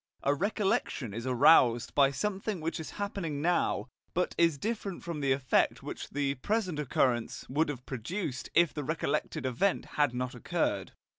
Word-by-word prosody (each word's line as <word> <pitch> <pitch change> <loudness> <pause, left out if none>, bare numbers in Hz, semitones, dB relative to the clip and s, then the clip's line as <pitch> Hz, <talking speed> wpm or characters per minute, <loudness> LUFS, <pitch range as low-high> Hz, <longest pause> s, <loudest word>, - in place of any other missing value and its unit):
A 140 - +3
recollection 190 - -1
is 115 +3 -5
aroused 125 -2 +5
by 140 -1 +5
something 195 - -2
which 165 +1 -3
is 160 - -6
happening 195 -7 -3
now, 170 -4 +1 0.3
but 180 +1 +1
is 165 -3 +3
different 205 0 -3
from 170 -3 -4
the 140 -2 +1
effect 130 -1 +2
which - - -6
the 140 -1 0
present 185 - -1
occurrence 125 -4 0
would 150 +4 +1
have 130 -4 -5
produced 130 - -4
if 170 -1 +5
the 150 - -4
recollected 155 -2 -2
event 130 +10 +1 0.2
had 140 -4 +2
not 125 0 -2
occurred. 120 - -1
145 Hz, 160 wpm, -30 LUFS, 130-180 Hz, 0.3 s, aroused